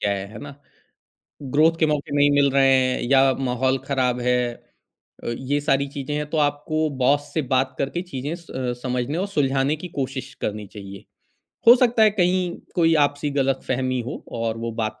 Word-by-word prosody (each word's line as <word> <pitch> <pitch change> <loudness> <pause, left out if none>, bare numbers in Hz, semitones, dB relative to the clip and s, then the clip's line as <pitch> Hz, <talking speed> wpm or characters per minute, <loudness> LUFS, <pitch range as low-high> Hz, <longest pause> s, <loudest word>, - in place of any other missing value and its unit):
क्या 100 - 0
है, 100 0 -4
है 110 - -9
ना? 140 -1 -9 0.9
ग्रोथ 155 +5 +2
के 160 - +4
मौके 145 -1 -2
नहीं 145 0 +4
मिल 140 -1 +4
रहे 135 0 +4
हैं 130 -1 +1
या 135 -1 +5
माहौल 130 0 0
ख़राब 125 -3 0
है। 125 0 +2 0.9
अ, - - -4
ये 145 +2 -1
सारी 140 -1 +1
चीज़ें 140 +1 -5
हैं 150 0 -3
तो 160 - -1
आपको 155 +2 -1
बॉस 145 +3 +2
से 155 - +1
बात 130 0 +1
करके 140 +6 -2
चीज़ें 145 -3 -5
स 170 -2 -13
अ, 125 -2 -2
समझने 125 +5 -2
और 195 - -1
सुलझाने 140 -3 +1
की 180 +4 -8
कोशिश 135 0 -4
करनी 105 -1 -3
चाहिए। 100 -1 -10 0.6
हो 240 - +11
सकता 240 -3 +3
है 215 - +6
कहीं 180 -2 +1 0.2
कोई 165 -2 +3
आपसी 145 +1 -4
ग़लतफ़हमी 130 -1 -1
हो - - -6 0.2
और 115 -1 -1
वो 115 0 -4
बात 110 0 -4
135 Hz, 190 wpm, -23 LUFS, 130-150 Hz, 0.9 s, हो